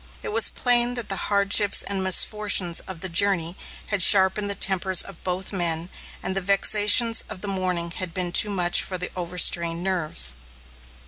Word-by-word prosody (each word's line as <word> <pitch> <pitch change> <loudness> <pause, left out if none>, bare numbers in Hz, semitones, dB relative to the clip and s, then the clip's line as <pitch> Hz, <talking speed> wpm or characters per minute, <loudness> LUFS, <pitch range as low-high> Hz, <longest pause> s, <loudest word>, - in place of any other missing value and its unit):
It - - -7
was 225 +1 0
plain 245 0 0
that 240 -2 -6
the 195 - -1
hardships 200 0 +2
and 195 -1 -5
misfortunes 190 -2 +3
of 185 -3 -10
the 190 - -6
journey 175 -1 0 0.4
had 200 - +1
sharpened 195 +2 +4
the 200 - -2
tempers 190 -1 0
of 195 -4 -15
both 185 +2 -6
men, 170 -2 -3 0.3
and 190 - -5
the 195 - -3
vexations 210 +4 +3
of 185 - -10
the 205 - -7
morning 180 -3 -4
had 185 0 -6
been 175 +1 -4
too 210 - +3
much 180 -3 +1
for 185 - -5
the 180 - -7
overstrained 170 -1 0
nerves. 155 - +1
190 Hz, 175 wpm, -21 LUFS, 175-200 Hz, 0.4 s, sharpened